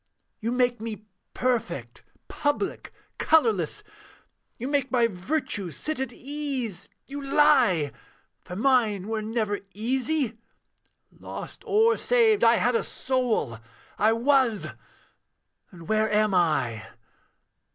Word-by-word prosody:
'You 230 +1 -2
make 245 -2 +1
me 220 -2 -6 0.3
perfect, 175 - -2 0.3
public, 310 +6 -2 0.3
colourless; 230 - +2 0.7
You 245 - -4
make 280 -2 0
my 245 -2 +4
virtues 205 - -2
sit 310 -3 -3
at 265 - -2
ease 265 -9 -4 0.2
you 285 +1 -7
lie! 240 - +4 0.5
For 180 - -8
mine 215 -4 +2
were 220 -1 -1
never 215 -2 -1 0.2
easy 250 +2 -1 0.7
lost - - -9
or 445 +2 +4
saved, 455 -4 +3
I 230 +1 +6
had 245 +2 +2
a 230 - +1
soul 245 - -1 0.4
I 215 +2 +4
was. 245 -2 +2 1.0
And 170 -4 -13
where 215 0 +1
am 210 -1 +2
I? 135 -11 +1
230 Hz, 110 wpm, -26 LUFS, 205-275 Hz, 1.0 s, I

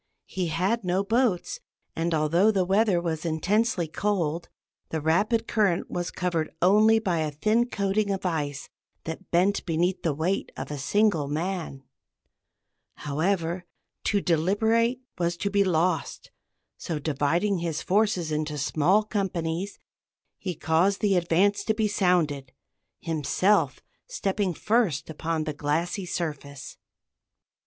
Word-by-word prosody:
He 185 -2 -3
had 190 +8 0
no 185 +2 +1
boats, 225 -3 0 0.4
and 165 +1 -1
although 165 +7 +3
the 195 -4 +2
weather 195 -1 +3
was 165 -2 -3
intensely 180 +3 +1
cold, 170 -2 -1 0.4
the 160 - -2
rapid 205 +9 +1
current 200 -6 +1
was 175 0 -2
covered 170 -3 -1
only 215 +5 +5
by 185 -7 0
a 155 -1 0
thin 215 +11 +1
coating 200 0 0
of 195 -1 -2
ice 145 -5 -2 0.4
that 165 +4 -7
bent 185 +4 +2
beneath 175 +2 0
the 160 -4 0
weight 175 +6 -1
of 135 +2 -5
a 145 - -4
single 175 -1 +2
man. 160 -2 -3 1.1
However, 170 +4 -1 0.4
to 205 -2 +2
deliberate 220 +9 +2 0.2
was 170 0 0
to 200 +3 -2
be 200 0 +3
lost; 175 -3 -1 0.5
so, 165 - -3
dividing 160 +6 0
his 165 -2 -3
forces 190 -5 +1
into 150 0 -2
small 155 +8 +2
companies, 190 -3 -2 0.6
he 180 -3 -4
caused 170 +7 +1
the 200 -2 +3
advance 185 +4 +2
to 220 - +1
be 215 -1 +1
sounded, 165 -9 +1 0.5
himself 165 +5 +1 0.3
stepping 200 - -1
first 205 - +1
upon 160 0 -2
the 155 -1 -3
glassy 165 +6 -2
surface. 145 -5 -5
175 Hz, 130 wpm, -26 LUFS, 160-200 Hz, 1.1 s, only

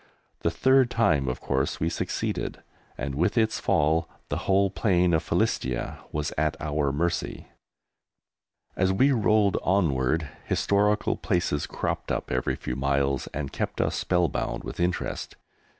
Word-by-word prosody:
The - - +1
third 130 +9 +4
time 80 - +2
of 65 - -2
course - - -1
we 80 - 0
succeeded, 85 - -3 0.3
and 70 +2 -3
with 85 - 0
its 110 -1 +2
fall 80 +2 +2 0.2
the - - -1
whole 100 0 +4
plain 90 -4 +2
of 80 - +3
Philistia 65 -1 -1
was 75 -1 -2
at 80 0 +1
our 75 -2 0
mercy. 85 +4 -2 1.3
As 95 +1 +2
we 130 +9 +4
rolled 110 -4 +3
onward 80 -5 +1 0.2
historical 105 +1 +1
places 80 -4 0
cropped - - -3
up - - -2
every 65 0 0
few 60 - -4
miles 70 0 0
and 70 -2 -4
kept - - -3
us - - +1
spellbound 90 -5 0
with - - -7
interest. 90 +1 -2
85 Hz, 140 wpm, -26 LUFS, 70-100 Hz, 1.3 s, third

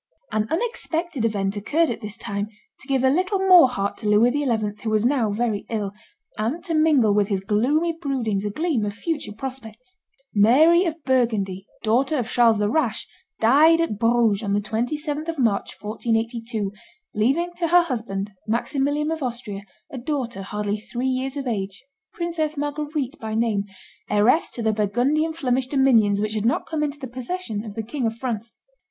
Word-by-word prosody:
An 215 0 0
unexpected 340 - -2
event 200 -2 0
occurred 295 +10 +1
at 235 - -5
this 210 0 -5
time 200 -2 -3 0.3
to 270 - -14
give 265 -2 +1
a 260 - +5
little 370 +6 +1
more 365 -7 +7
heart 200 -5 -2
to 215 - -5
Louis 215 +4 +5
XI., 290 +1 -1 0.3
who 225 - -2
was 215 +1 +2
now 250 -4 +2
very 210 0 -1
ill, 205 -3 -2 0.5
and 255 +11 -1
to 345 -3 -3
mingle 300 -9 +4
with 205 -1 +2
his 195 -3 -1
gloomy 255 - +1
broodings 260 - -2
a 210 - -1
gleam 300 - 0
of 205 -1 -3
future 295 -4 -3
prospects. 255 - -9 0.4
Mary 305 - +5
of 325 -2 -3
Burgundy, 215 -7 0 0.2
daughter 260 +7 +2
of 240 -4 -1
Charles 235 -3 +4
the 205 0 +1
Rash, 245 -2 0 0.3
died 300 +9 +5
at 330 -12 -1
Bruges 230 -3 +3
on 200 -3 -1
the 205 - +2
27th 290 +9 -2
of 330 -1 -3
March, 225 -7 0
1482, 225 -1 -2 0.4
leaving 280 +12 +1
to 340 - 0
her 350 +1 +6
husband, 220 -9 -3 0.2
Maximilian 285 +6 0
of 320 -1 -3
Austria, 235 -6 -4 0.3
a 265 - -5
daughter, 245 -6 -3
hardly 205 +1 -2
three 245 +4 -3
years 260 +2 -2
of 275 - -3
age, 200 0 -4 0.3
Princess 325 -3 -2
Marguerite 290 -1 -3
by 220 -1 -4
name, 220 -3 +1 0.4
heiress 215 +10 +3
to 235 - -5
the 220 0 +2
Burgundian 245 +10 +1
Flemish 260 -5 0
dominions 240 -7 +3
which 215 +1 -1
had 215 -1 -1
not 245 - +1
come 315 -2 -3
into 295 -1 -2
the 280 - -7
possession 250 - -4
of 210 -3 -8
the 225 - -3
King 240 +2 -2
of 225 - -3
France. 230 -2 -5
240 Hz, 180 wpm, -23 LUFS, 215-295 Hz, 0.5 s, more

